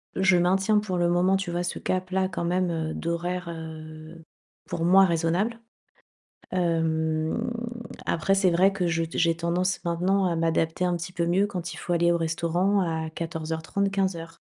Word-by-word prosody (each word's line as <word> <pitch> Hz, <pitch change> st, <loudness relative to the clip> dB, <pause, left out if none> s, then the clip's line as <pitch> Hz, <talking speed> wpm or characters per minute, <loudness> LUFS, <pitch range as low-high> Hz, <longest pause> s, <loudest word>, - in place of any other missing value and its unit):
je 190 Hz, -1 st, +4 dB
maintiens 190 Hz, +4 st, +3 dB
pour 200 Hz, -3 st, -3 dB
le 175 Hz, 0 st, +2 dB
moment, 180 Hz, +2 st, +3 dB
tu 195 Hz, -2 st, -4 dB
vois 175 Hz, +1 st, -1 dB
ce 175 Hz, -, -3 dB
cap-là 185 Hz, +1 st, -1 dB
quand 175 Hz, -2 st, -4 dB
même, 180 Hz, +1 st, +1 dB
heu, 160 Hz, -2 st, -2 dB
d'horaires, 170 Hz, +1 st, -3 dB
heu, 160 Hz, 0 st, -9 dB, 0.5 s
pour 165 Hz, -, -2 dB
moi 190 Hz, +2 st, +7 dB
raisonnables. 175 Hz, +7 st, 0 dB, 0.9 s
Hem, 160 Hz, +3 st, 0 dB, 0.6 s
après 170 Hz, +4 st, +1 dB
c'est 195 Hz, -2 st, +3 dB
vrai 185 Hz, +3 st, +4 dB
que 185 Hz, -2 st, -1 dB
je 165 Hz, 0 st, 0 dB
t 165 Hz, -, -6 dB
j'ai 165 Hz, -1 st, +3 dB
tendance 175 Hz, +3 st, 0 dB
maintenant 180 Hz, +3 st, +1 dB
à 170 Hz, -2 st, 0 dB
m'adapter 165 Hz, +1 st, 0 dB
un 175 Hz, -, +1 dB
petit 175 Hz, +2 st, -6 dB
peu 170 Hz, -2 st, -1 dB
mieux 185 Hz, +4 st, +3 dB
quand 180 Hz, -4 st, -5 dB
il -, -, -9 dB
faut 175 Hz, -, -3 dB
aller 170 Hz, 0 st, +3 dB
au -, -, +2 dB
restaurant 170 Hz, +4 st, +1 dB
à 160 Hz, -3 st, -2 dB
14:30, 160 Hz, +4 st, -3 dB
15:00. 170 Hz, -4 st, -2 dB
175 Hz, 175 wpm, -26 LUFS, 165-185 Hz, 0.9 s, moi